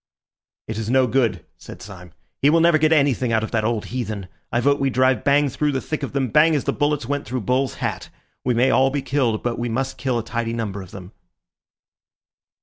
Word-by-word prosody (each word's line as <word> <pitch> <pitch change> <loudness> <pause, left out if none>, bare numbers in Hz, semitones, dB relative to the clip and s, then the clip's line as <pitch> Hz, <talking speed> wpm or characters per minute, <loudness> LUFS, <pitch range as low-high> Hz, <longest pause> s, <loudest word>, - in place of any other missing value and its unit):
"It 110 0 -4
is 110 0 -4
no 130 +1 +4
good," 115 -8 0
said - - -11
Syme. 90 -3 -11 0.3
"He 140 - +5
will 165 +2 +4
never 165 -1 +4
get 155 +1 +3
anything 140 -5 +2
out 110 -1 +1
of 110 - -5
that 110 -2 0
old 110 -1 -1
heathen. 105 -6 -4 0.2
I 120 - +1
vote 140 +3 +2
we 135 - +1
drive 130 0 +2
bang 145 +1 +3
through 145 +2 -1
the 135 - 0
thick 155 +3 -4
of 140 - -5
them, 135 -3 0
bang 155 +5 +4
as 145 - 0
the - - -1
bullets 145 -3 0
went 145 0 -3
through 125 +2 -3
Bull's 125 +4 0
hat. - - -4 0.3
We 125 -1 +1
may 130 +3 +3
all 130 0 +4
be 140 0 -3
killed, 125 -6 0
but 120 -1 -2
we 120 0 -2
must 130 +3 -3
kill 130 -3 0
a 115 - -2
tidy 115 0 -3
number 105 -4 -4
of 95 - -11
them." 90 0 -10
125 Hz, 230 wpm, -22 LUFS, 115-140 Hz, 0.3 s, He